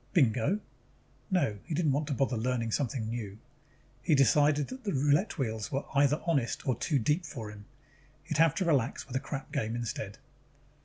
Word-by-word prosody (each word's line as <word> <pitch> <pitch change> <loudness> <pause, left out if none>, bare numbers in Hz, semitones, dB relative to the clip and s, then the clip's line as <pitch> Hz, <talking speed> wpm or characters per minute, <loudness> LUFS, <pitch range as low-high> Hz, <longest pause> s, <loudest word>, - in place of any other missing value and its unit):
Bingo? 130 - +3 0.7
No, 140 - +1
he 160 - -3
didn't 155 -3 +2
want 145 +2 0
to 145 - -1
bother 135 -1 +1
learning 115 0 -1
something 125 -3 -1
new. 110 -3 -5 0.6
He 150 +4 +3
decided 145 +2 +4
that 260 0 -8
the 200 - -1
roulette 145 +7 +2
wheels 110 -6 -2
were 135 +1 -1
either 145 +2 +4
honest 140 -9 0
or 130 - +3
too 145 +6 0
deep 150 +9 +1
for 115 -9 -6
him. 105 0 -12 0.6
He'd 155 -1 -3
have 165 -3 +5
to 190 - 0
relax 140 -8 +1
with 130 - -8
a - - +2
crap 135 +1 -6
game 115 -5 -1
instead. 110 -4 -4
135 Hz, 185 wpm, -30 LUFS, 115-155 Hz, 0.7 s, have